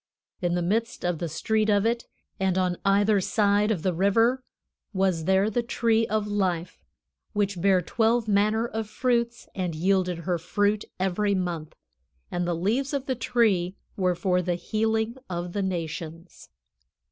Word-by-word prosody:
In 175 -1 +1
the 175 - 0
midst 225 +4 -1
of 175 -3 0
the 170 - -3
street 215 +7 0
of 205 0 +3
it, 235 +1 0 0.3
and 190 -1 +1
on 180 -1 +1
either 200 +1 +3
side 205 +1 +2
of 190 -8 -1
the 185 - +1
river, 225 +8 +2 0.5
was 190 -4 +1
there 190 +2 +3
the 220 +3 0
tree 230 -1 +1
of 215 -1 0
life, 185 -4 -2 0.5
which 200 -4 -1
bare 190 -1 +4
twelve 225 +5 +1
manner 215 +3 +2
of 220 -2 -4
fruits 235 0 0
and 180 -4 -3
yielded 180 +1 +1
her 175 +1 -2
fruit 205 +5 0
every 195 +2 +1
month; 175 -4 -3 0.6
and 175 0 -1
the 175 - 0
leaves 240 - 0
of 275 -1 -2
the 265 - 0
tree 225 -7 +1 0.2
were 180 -2 +1
for 180 0 +1
the 175 0 -1
healing 220 +5 -1
of 175 0 -4
the 205 - -1
nations." 170 -2 -5
195 Hz, 160 wpm, -26 LUFS, 180-220 Hz, 0.6 s, bare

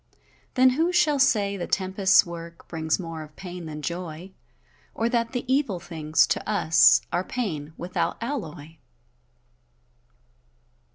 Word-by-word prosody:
Then 255 0 +6
who 325 +7 +1
shall 305 -5 +3
say 205 -6 +2
the 175 - -4
tempest's 190 0 +3
work 170 -1 -9
Brings 160 -1 -1
more 165 -3 -6
of 155 0 -12
pain 180 -3 -8
than 150 -1 -7
joy; 170 +1 -5 0.6
Or 230 +1 0
that 230 -1 0
the 245 -1 -3
evil 260 -8 +1
things, 160 -2 +1
to - - -2
us 165 -6 +5
Are 175 +1 +1
pain, 160 - -4
without 180 +2 -2
alloy? 165 - -6
180 Hz, 130 wpm, -25 LUFS, 160-230 Hz, 0.6 s, Then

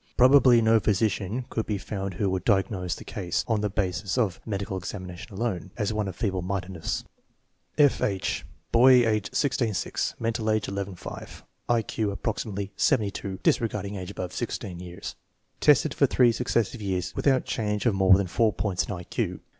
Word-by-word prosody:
Probably 125 -2 +6
no 110 0 +5
physician 105 +2 0
could 110 - -2
be 105 - -1
found 95 -1 -5
who 100 - 0
would 95 -2 -2
diagnose 95 -3 +1
the - - -10
case, 90 -4 -2
on 110 -3 +1
the 105 - 0
basis 95 +1 -2
of 110 -8 0
a - - -11
medical 100 -1 -3
examination 90 +2 -7
alone, 100 -3 -3
as 105 -1 -1
one 105 -1 -1
of 95 - -5
feeble 95 -3 -1
mindedness. 95 -2 -3 0.7
F. 145 -2 +4
H. 95 -3 -1 0.3
Boy, 125 0 +6
age 110 -1 0
16 130 -5 0
6; - - -2
mental 115 -1 -1
age 110 0 +1
11 100 -1 -4
5; - - -9 0.3
I 120 -2 +3
Q 110 0 -2
approximately 100 -1 -3
72 100 -6 0
(disregarding 105 -3 0
age 90 -2 -6
above 90 -3 -5
16 100 -6 -4
years). 90 -1 -7 0.4
Tested - - +4
for - - +3
three 125 -2 +4
successive 115 -1 -1
years 95 -2 -2
without 135 -2 +2
change 105 -1 -2
of 120 - +3
more 95 -1 +6
than 100 - 0
four 110 +5 +2
points 95 -2 -1
in - - -6
I 90 -3 -5
Q. - - -3
100 Hz, 180 wpm, -26 LUFS, 95-115 Hz, 0.7 s, Probably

